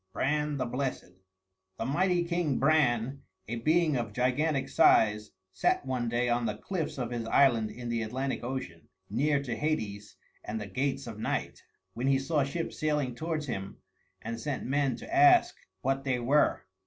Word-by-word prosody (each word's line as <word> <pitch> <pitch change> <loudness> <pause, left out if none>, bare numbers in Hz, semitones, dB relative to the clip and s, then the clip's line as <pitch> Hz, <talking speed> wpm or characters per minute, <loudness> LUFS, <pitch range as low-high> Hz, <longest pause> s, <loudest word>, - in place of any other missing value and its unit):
V 95 - -52
BRAN 150 +1 0
THE 130 - -1
BLESSED 125 -6 -3 0.6
The 115 - -3
mighty 175 +6 +2
king 170 -5 0
Bran, 135 -3 +2 0.3
a 120 +2 -3
being 155 +5 +2
of 115 -4 -2
gigantic 135 +4 +1
size, 105 0 +4 0.2
sat 95 +8 +1
one 125 -3 -1
day 120 +1 0
on 120 -1 +1
the 105 -1 -3
cliffs 165 - -4
of 125 -2 -3
his 115 -2 -3
island 115 -3 +4
in 120 +1 -8
the 115 -1 -1
Atlantic 130 +5 -3
Ocean, 120 - -5 0.2
near 140 +5 +1
to 120 -4 -3
Hades 110 -7 -3 0.3
and 110 +1 -4
the 105 - -5
Gates 130 +8 -2
of 110 -3 -8
Night, - - -3 0.3
when 120 +5 -2
he 135 0 +4
saw 145 +2 +1
ships 165 +5 -4
sailing 150 -4 0
towards 155 +3 -3
him 100 -7 -5 0.5
and 115 +1 -4
sent 145 +1 -3
men 140 -1 +1
to 325 - -6
ask 360 0 +6 0.3
what 135 +1 0
they 130 -2 0
were. 130 +1 +2
130 Hz, 175 wpm, -29 LUFS, 115-150 Hz, 0.6 s, ask